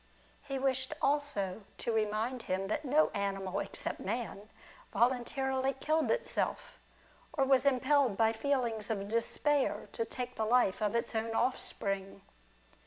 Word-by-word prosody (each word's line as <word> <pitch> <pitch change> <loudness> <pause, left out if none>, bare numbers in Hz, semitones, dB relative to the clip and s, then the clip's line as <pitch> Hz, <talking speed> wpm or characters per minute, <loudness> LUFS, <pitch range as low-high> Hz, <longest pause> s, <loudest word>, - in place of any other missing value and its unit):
He 275 -1 -4
wished 265 -1 0
also 275 -10 0 0.2
to 235 - -2
remind 220 +3 0
him 190 0 -2
that 215 - -1
no 295 +3 +4
animal 195 -2 -1
except - - -4
man 215 -1 -4 0.4
voluntarily 265 +2 +1
killed 310 +4 +1
itself, - - -1 0.5
or 275 -4 +2
was 265 0 +4
impelled 265 -4 +3
by 225 0 +4
feelings 235 -4 -1
of 200 -3 -2
despair 270 +5 0
to 230 - -1
take 250 +2 -5
the 220 - +1
life 225 -3 +3
of 210 +1 +1
its 235 - -1
own 225 0 -1
offspring. 195 -6 -2
240 Hz, 135 wpm, -33 LUFS, 215-270 Hz, 0.5 s, no